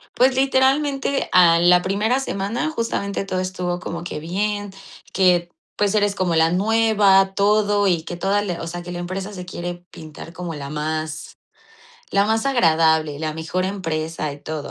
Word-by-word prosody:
Pues, 260 +1 +3
literalmente, 275 +1 +1
a 170 -2 +6
la 175 +1 +5
primera 210 +7 0
semana, 235 +3 -2
justamente 230 -8 -3
todo 185 -1 -2
estuvo 180 -1 -3
como 170 -1 -6
que 175 - -5
bien, 205 +5 -2 0.4
que, 175 -2 +2 0.3
pues, 205 0 +1
eres 205 -1 +2
como 180 -4 0
la 160 0 +3
nueva, 200 -1 +3
todo, 205 0 +2
y 170 -3 +1
que 175 - -6
toda 195 +3 +1
la 180 -4 -4
o 165 - -5
sea, 175 +1 -5
que 175 - -8
la 175 - -5
empresa 190 +3 -5
se 180 -2 -7
quiere 175 -1 -6
pintar 165 -1 -11
como 175 -3 -6
la 140 -1 -7
más, 155 +1 -4 0.7
la 200 0 +3
más 220 +1 0
agradable, 160 - +2
la 155 -1 -3
mejor 165 +3 -2
empresa 165 -5 -3
y 145 - -12
todo. 155 -1 -6
185 Hz, 170 wpm, -21 LUFS, 165-205 Hz, 0.7 s, a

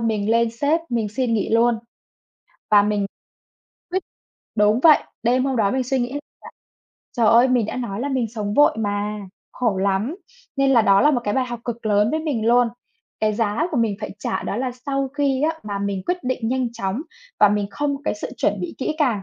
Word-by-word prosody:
mình 220 -2 0
lên 230 0 +3
sếp 290 +8 +1
mình 230 -3 -1
xin 230 +2 -1
nghỉ 210 - 0
luôn. 230 0 +3 0.9
Và 205 -1 +7
mình 205 -1 0 0.9
quyết 375 -1 -1 0.5
đúng 210 +3 +3
vậy. 310 -1 +6 0.2
Đêm 250 +2 +2
hôm 270 -2 0
đó 205 -3 +2
mình 260 +3 0
suy 265 +2 0
nghĩ 245 +1 -2
là 290 - -3 1.0
trời 230 -2 +3
ơi! 235 +4 +6
Mình 245 -4 +2
đã - - -5
nói 235 -4 -4
là 280 - -2
mình 260 -4 0
sống 210 -2 -3
vội 290 -5 +5
mà, 205 0 -2 0.3
khổ 230 -6 0
lắm. 200 - 0 0.4
Nên 275 0 +3
là 240 -4 +5
đó 195 -2 +5
là 295 - +5
một 255 -5 +1
cái 205 - 0
bài 265 - +1
học 240 -1 -6
cực 235 -2 -5
lớn 210 +1 +3
với 315 - -1
mình 275 -9 -2
luôn. 240 0 +4 0.5
Cái 215 0 +2
giá 225 +8 0
của 295 - -2
mình 225 -4 +1
phải - - -5
trả - - -2
đó 200 - -3
là 255 +1 -1 0.2
sau 275 -1 -1
khi 275 -1 0
á 320 +1 0
mà 205 -1 -4
mình 200 -2 -2
quyết 360 0 -2
định 250 -3 -1
nhanh 255 -1 -1
chóng 225 +3 -3 0.4
và 210 - +8
mình 205 0 0
không 285 +5 -1
có 275 - -14
cái - - 0
sự 210 - -6
chuẩn 205 -1 0
bị 175 - -5
kỹ 290 - -2
càng 245 -10 +1
235 Hz, 220 wpm, -22 LUFS, 210-265 Hz, 1.0 s, và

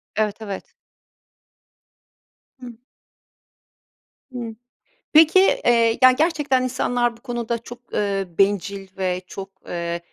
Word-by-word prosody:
Evet, 215 0 -1
evet. 200 -3 -7 1.9
Hı. 245 -2 -9 1.6
Hı. 235 -3 -6 0.6
Peki, 320 +4 +7
eee, 235 -10 +3
yani, 255 0 +7
gerçekten 295 -4 +1
insanlar 240 -1 0
bu - - -26
konuda 240 -2 -3
çok, 240 +1 -13
ııı, 195 -4 -2
bencil 200 0 +1
ve 185 -1 -1
çok, 195 +1 -8 0.2
ııı, 170 0 -3
230 Hz, 100 wpm, -22 LUFS, 195-250 Hz, 1.9 s, Peki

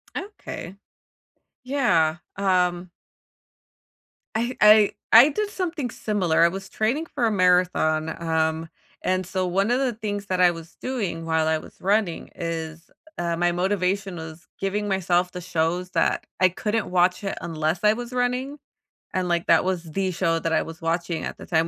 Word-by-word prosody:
Okay. 385 - -7 0.9
Yeah, 215 - +2 0.2
um 180 -2 +1 1.5
I 240 +3 -1
I 210 0 +7 0.2
I 240 +6 +9
did 415 +7 -2
something 340 - -3
similar. 190 -9 0
I - - +7
was 195 +1 -7
training 260 +10 -1
for 240 - -1
a 225 - +2
marathon, 180 -4 +2
um, 160 0 0 0.3
and 185 0 0
so, 185 +1 -2
one 195 +5 +1
of 250 - +2
the 260 -3 0
things 205 -2 -4
that 185 -1 -1
I 180 -1 +6
was 165 -1 -10
doing 205 -11 -3
while 160 -1 +1
I 160 0 +2
was - - -12
running 195 -3 0
is, 165 -1 -5 0.3
uh, 170 -1 -1
my 175 0 +2
motivation 190 +1 -1
was 160 +1 -9
giving 205 +2 -1
myself 180 -2 +1
the 180 - -7
shows 175 +1 -1
that - - +1
I 185 0 +5
couldn't 210 +4 -2
watch, 180 +2 +2
eh, 195 - -2
unless 160 +1 -1
I 210 0 +5
was 240 +1 -6
running. 250 +3 -1 0.5
And, 185 -1 0
like, 170 -1 0
that 165 +2 +5
was 185 -3 -1
the 185 +3 -2
show 165 -2 0
that 165 0 -1
I - - +3
was 165 0 -8
watching 165 0 -1
at - - -6
the - - -10
time- 165 -1 +1
185 Hz, 170 wpm, -24 LUFS, 165-210 Hz, 1.5 s, I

